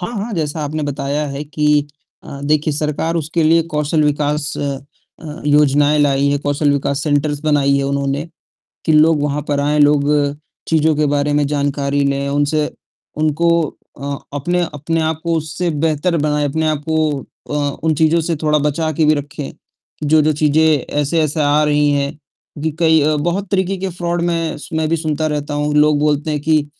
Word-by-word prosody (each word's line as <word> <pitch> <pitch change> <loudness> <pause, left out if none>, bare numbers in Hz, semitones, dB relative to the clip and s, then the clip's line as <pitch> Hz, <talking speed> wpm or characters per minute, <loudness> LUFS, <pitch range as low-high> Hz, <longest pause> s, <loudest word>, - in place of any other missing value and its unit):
हाँ, 190 +6 -4
हाँ, 220 +3 -4
जैसा 155 -2 -2
आपने 155 +1 -3
बताया 145 +1 -2
है 140 +2 -5
कि 150 0 +1 0.4
अ, 140 - -8
देखिए 155 +1 +1
सरकार 150 +2 -2
उसके 165 +1 -1
लिए 165 +1 +4
कौशल 150 +1 +1
विकास 150 0 0
अ 140 -1 -2 0.4
अ, 155 +1 -8
योजनाएँ 145 0 +4
लाई 140 -1 +2
है, 145 - +1
कौशल 145 +1 0
विकास 140 0 -1
सेंटर्स 145 -1 0
बनाई 140 -2 +3
है - - 0
उन्होंने, 140 +1 -1 0.6
कि 160 - +2
लोग 155 0 +4
वहाँ 145 0 -1
पर 145 - +1
आएँ, 150 +1 +2 0.9
चीज़ों 160 -1 +2
के 150 +1 +1
बारे 145 0 +1
में 145 0 +2
जानकारी 145 -1 0
लें 140 0 -1
उनसे 145 +2 +1 0.5
उनको 155 +2 +1 0.5
अ, 140 0 -3 0.2
अपने 175 +6 0
अपने 160 +3 -2
आप 160 0 -1
को 170 -1 0
उससे 160 +3 -3 0.2
बेहतर 160 +3 0
बनाएँ, 150 -1 0
अपने 160 +3 -1
आप 150 -1 -2
को 155 -3 +1 0.3
अ, - - -2 0.3
उन 160 -1 +2
चीज़ों 160 +2 +3
से 165 +1 -1
थोड़ा 150 0 +3
बचाके 155 +1 0
भी 155 - +5
रखें, 145 -1 -5 0.5
जो-जो 155 +1 +3
चीज़ें 150 +1 +2 0.4
ऐसे-ऐसे 155 +1 0
आ 145 +1 +3
रही 150 -1 +2
हैं 140 0 0 0.5
कि 160 - 0
कई 160 -2 +4 0.2
बहुत 180 +4 -2
तरीके 190 0 0
के 190 0 -3
फ्रॉड 175 0 -2
मैं 165 -2 -1
स - - -11
मैं 160 0 0
भी 165 - +1
सुनता 155 -1 -1
रहता 150 -1 -3
हूँ। 150 0 -1
लोग 150 0 +4
बोलते 150 +1 0
हैं 150 - -1
कि 155 -1 +2
150 Hz, 180 wpm, -17 LUFS, 145-160 Hz, 0.9 s, भी